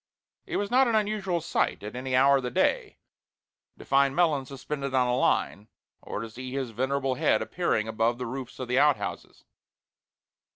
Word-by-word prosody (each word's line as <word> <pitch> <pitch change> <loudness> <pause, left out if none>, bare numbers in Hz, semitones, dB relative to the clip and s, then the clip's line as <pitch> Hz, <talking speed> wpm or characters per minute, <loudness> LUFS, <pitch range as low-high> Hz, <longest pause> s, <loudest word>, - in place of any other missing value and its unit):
It - - -2
was 205 +1 -2
not 260 +1 +5
an 230 - +1
unusual 205 -5 0
sight 155 - -1
at 105 +3 -7
any 130 +1 -2
hour 140 +2 +5
of - - -2
the 125 - -3
day 120 - 0 0.8
to - - -12
find 135 0 +3
Melons 155 -7 +2
suspended 140 0 -5
on 125 -1 +3
a 125 - +1
line, 105 -4 0 0.3
or - - -5
to 115 - -6
see 130 +3 -8
his 130 -3 -3
venerable 135 +3 -1
head 125 - +2
appearing 110 0 -1
above 115 +2 0
the 125 - -4
roofs 130 +1 -6
of 130 - -5
the 125 +2 +2
outhouses. 130 -10 0
130 Hz, 180 wpm, -27 LUFS, 125-140 Hz, 0.8 s, not